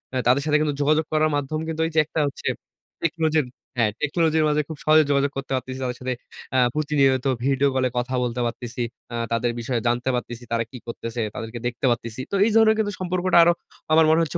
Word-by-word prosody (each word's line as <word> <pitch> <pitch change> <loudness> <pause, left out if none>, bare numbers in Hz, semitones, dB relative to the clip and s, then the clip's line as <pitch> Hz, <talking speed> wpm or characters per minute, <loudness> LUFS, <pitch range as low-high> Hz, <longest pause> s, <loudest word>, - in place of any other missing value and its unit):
আ - - +1
তাদের 130 +3 +4
সাথে 150 -1 +3
কিন্তু 150 -2 +1
যোগাযোগ 155 +2 +3
করার 155 0 +3
মাধ্যম 145 +2 -2
কিন্তু 160 0 -2
এই - - -6
যে 160 - +5
একটা 160 - -3
হচ্ছে, 140 - -6 0.6
টেকনোজির 160 -3 +1 0.3
হ্যাঁ, 115 -3 +3
টেকনোলজির 160 +1 +2
মাঝে 150 0 +2
খুব 160 - -7
সহজে 155 0 +6
যোগাযোগ 140 0 +2
করতে 135 - -5
পারতেছি 130 +1 -4
তাদের 125 -1 -3
সাথে, 130 0 -1 0.4
আ - - +4 0.2
প্রতিনিয়ত 140 -4 +2 0.2
ভিডিও 140 +1 +3
কলে 130 -1 +2
কথা 125 +1 -1
বলতে 125 0 -2
পারতেছি, 120 +1 -4 0.3
আ - - -3 0.2
তাদের 115 +1 +1
বিষয়ে 120 +1 -1
জানতে 120 +2 0
পারতেছি 120 0 -5
তারা 115 0 +1
কি 130 - -8
করতেছে? 115 0 -4
তাদেরকে 115 +1 -6
দেখতে 120 +2 -3
পারতেছি। 115 +1 -3
তো 200 - 0
এই 225 - +2
ধরনের 220 -1 +6
কিন্তু 210 -1 0
সম্পর্কটা 185 -1 +1
আরো 175 +1 +5 0.4
আমার 160 0 +6
মনে 160 - +5
হচ্ছে 155 - -3
140 Hz, 210 wpm, -23 LUFS, 125-155 Hz, 0.6 s, সহজে